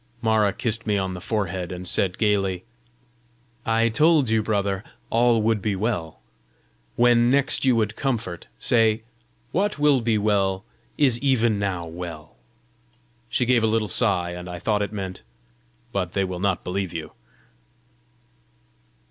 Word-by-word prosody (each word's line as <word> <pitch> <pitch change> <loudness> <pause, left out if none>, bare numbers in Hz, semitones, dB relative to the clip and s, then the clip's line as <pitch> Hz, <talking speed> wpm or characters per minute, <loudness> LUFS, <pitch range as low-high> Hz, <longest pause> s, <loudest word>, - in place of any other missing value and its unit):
Mara 110 -3 +2
kissed 115 +1 -3
me 105 -1 +2
on 95 -1 -2
the 90 - -7
forehead, 95 -3 -2
and 90 0 -6
said, 90 +1 +1
gayly, 100 -4 +1 1.0
"I 115 0 +3
told 150 +1 +3
you, 110 -1 +2
brother, 100 -2 -1 0.3
all 115 -1 +3
would 110 -2 +1
be 105 -1 -1
well! 95 -6 -3 0.7
When 120 0 +4
next 135 +1 +2
you 130 -2 +4
would 110 -2 0
comfort, 115 -11 -3
say, 110 - +3 0.5
'What 205 +4 0
will 145 -3 +3
be 115 -1 +1
well, 100 -1 +1 0.3
is 130 -6 +3
even 120 -6 +2
now 95 -4 -2
well.'" 80 -2 -8 0.9
She 125 - +1
gave 120 -1 +3
a - - +4
little 110 -1 +1
sigh, 95 -7 +1
and 90 0 -7
I 90 - -5
thought 105 +3 0
it 100 - -2
meant, 95 -3 -5 0.7
"But 90 -5 -2
they 100 - +1
will 90 -2 -4
not 95 -1 0
believe 90 -1 -3
you!" 80 -2 -5
105 Hz, 150 wpm, -24 LUFS, 95-115 Hz, 1.0 s, When